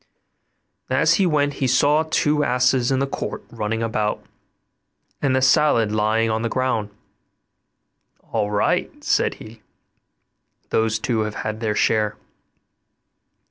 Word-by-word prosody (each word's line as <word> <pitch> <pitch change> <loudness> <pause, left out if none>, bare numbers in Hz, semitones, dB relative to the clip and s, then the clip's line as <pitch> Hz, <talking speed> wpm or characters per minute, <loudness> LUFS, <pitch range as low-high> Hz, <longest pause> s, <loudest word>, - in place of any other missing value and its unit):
And - - 0
as - - +4
he 190 - +3
went 145 -3 +1
he 130 - +2
saw 145 +4 +3
two 150 -2 +1
asses 125 -1 +2
in 135 - +2
the 135 - +1
court 135 - -5
running 115 0 -3
about, 110 -2 -2 1.0
and 135 -3 +1
the 130 - +1
salad 130 -5 +3
lying 110 +1 +1
on 110 0 -1
the 115 - -1
ground. 130 -5 -1 1.4
'All 105 - 0
right!' 105 0 -1
said - - +1
he; 110 0 -13 1.1
'those 110 -1 +1
two 115 +1 -1
have 105 -1 -2
had 110 0 -3
their 110 -2 -1
share. 105 0 +1
115 Hz, 135 wpm, -22 LUFS, 110-130 Hz, 1.4 s, as